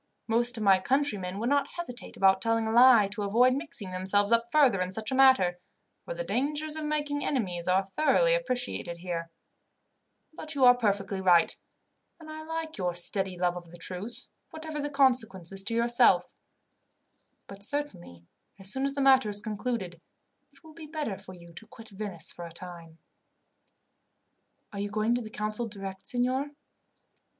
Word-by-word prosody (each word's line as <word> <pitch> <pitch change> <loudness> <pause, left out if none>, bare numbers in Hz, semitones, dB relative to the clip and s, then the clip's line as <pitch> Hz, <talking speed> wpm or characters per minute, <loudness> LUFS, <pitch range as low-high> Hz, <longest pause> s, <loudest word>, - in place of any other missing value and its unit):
Most 240 +2 0
of 220 - -3
my 195 -2 +5
countrymen 205 -7 -1
would 230 +4 -2
not 285 -1 +2
hesitate 255 -8 -4
about 190 0 +4
telling 225 0 0
a - - -1
lie, 240 -3 +6
to 205 +1 -6
avoid 235 +6 +3
mixing 270 - -4
themselves 195 +3 0
up 230 0 +2
further 270 -11 +4
in 185 0 -2
such 215 +4 -2
a - - 0
matter, 260 -10 +4 0.5
for - - -6
the - - -4
dangers 300 - -1
of 310 -1 -4
making 295 -1 -2
enemies 185 -10 -2
are 185 +1 +3
thoroughly 310 - +2
appreciated 250 - -2
here; 170 -1 -5 1.0
but 310 -1 -7
you 265 -2 +4
are 245 - +9
perfectly 200 -4 -1
right, 175 -3 +4 0.6
and 310 -1 -11
I 310 0 -8
like 320 -3 -6
your 180 -2 -1
steady 190 +1 +2
love 175 0 0
of 175 -1 -9
the 175 - -12
truth, 185 +7 -6 0.2
whatever 315 -1 -6
the 290 - -3
consequences 220 - +1
to 230 - -3
yourself; 235 +1 +4 1.1
but 200 0 -12
certainly 200 - -4 0.3
as 195 0 0
soon 265 +3 0
as 275 0 -1
the 280 - -1
matter 265 -4 +5
is 205 0 0
concluded, 210 -5 -4 0.5
it - - -24
will 315 -1 -15
be 315 -1 -11
better 300 -9 -4
for 185 - -12
you 170 -1 -15
to 220 +7 -12
quit 225 0 -14
Venice 195 -5 -5
for 175 -1 -8
a - - -13
time." 170 -1 -9 1.8
"Are 200 - -6
you 205 +1 -3
going 215 +2 0
to 245 - -1
the 220 - -8
council 215 +2 -3
direct, 195 -2 -8
signor?" 255 +3 -1
220 Hz, 175 wpm, -28 LUFS, 190-270 Hz, 1.8 s, are